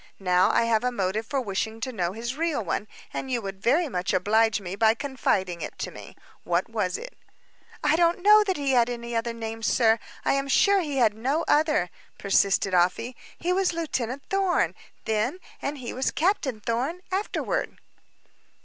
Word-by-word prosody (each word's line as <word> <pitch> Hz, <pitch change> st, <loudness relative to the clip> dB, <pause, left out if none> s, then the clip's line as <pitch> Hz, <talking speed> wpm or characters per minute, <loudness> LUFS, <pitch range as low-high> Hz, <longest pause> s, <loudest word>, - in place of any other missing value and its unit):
Now, 180 Hz, -1 st, +3 dB
I -, -, +3 dB
have 230 Hz, -1 st, +2 dB
a 250 Hz, -, +1 dB
motive 210 Hz, 0 st, -2 dB
for 280 Hz, -, -1 dB
wishing 220 Hz, 0 st, -3 dB
to 255 Hz, +2 st, -3 dB
know 180 Hz, -4 st, -1 dB
his 235 Hz, +4 st, -4 dB
real 310 Hz, -8 st, -1 dB
one, 205 Hz, +5 st, -2 dB, 0.3 s
and 265 Hz, -, -4 dB
you 250 Hz, -2 st, 0 dB
would 195 Hz, -1 st, -6 dB
very 300 Hz, -, +3 dB
much 180 Hz, -7 st, -2 dB
oblige 215 Hz, +2 st, +3 dB
me 190 Hz, -1 st, -6 dB
by 220 Hz, +2 st, +4 dB
confiding 195 Hz, -, -1 dB
it -, -, -6 dB
to -, -, -4 dB
me. -, -, -11 dB, 0.3 s
What -, -, 0 dB
was -, -, -1 dB
it?" -, -, -9 dB, 0.7 s
"I 300 Hz, +1 st, +4 dB
don't 345 Hz, +1 st, +2 dB
know 425 Hz, +1 st, +7 dB
that 380 Hz, -4 st, 0 dB
he 280 Hz, -2 st, 0 dB
had 245 Hz, -2 st, +4 dB
any 235 Hz, -1 st, -5 dB
other 230 Hz, +1 st, 0 dB
name, 225 Hz, -1 st, -6 dB
sir; 225 Hz, 0 st, +3 dB, 0.3 s
I -, -, +3 dB
am 275 Hz, 0 st, 0 dB
sure 400 Hz, +8 st, +4 dB
he 295 Hz, -5 st, -3 dB
had 225 Hz, -5 st, +4 dB
no 270 Hz, +9 st, -1 dB
other," 300 Hz, -, +2 dB, 0.3 s
persisted 195 Hz, -1 st, +2 dB
Afy. 180 Hz, +8 st, +1 dB, 0.2 s
"He 355 Hz, +2 st, 0 dB
was 380 Hz, -1 st, +1 dB
Lieutenant 280 Hz, -5 st, -3 dB
Thorn, 390 Hz, -2 st, +1 dB, 0.3 s
then 220 Hz, +8 st, 0 dB, 0.2 s
and 290 Hz, +1 st, -3 dB
he 250 Hz, -3 st, -6 dB
was 260 Hz, +1 st, 0 dB
Captain 295 Hz, -, 0 dB
Thorn, 255 Hz, -, -2 dB
afterward." 415 Hz, +5 st, -2 dB
240 Hz, 185 wpm, -26 LUFS, 215-300 Hz, 0.7 s, know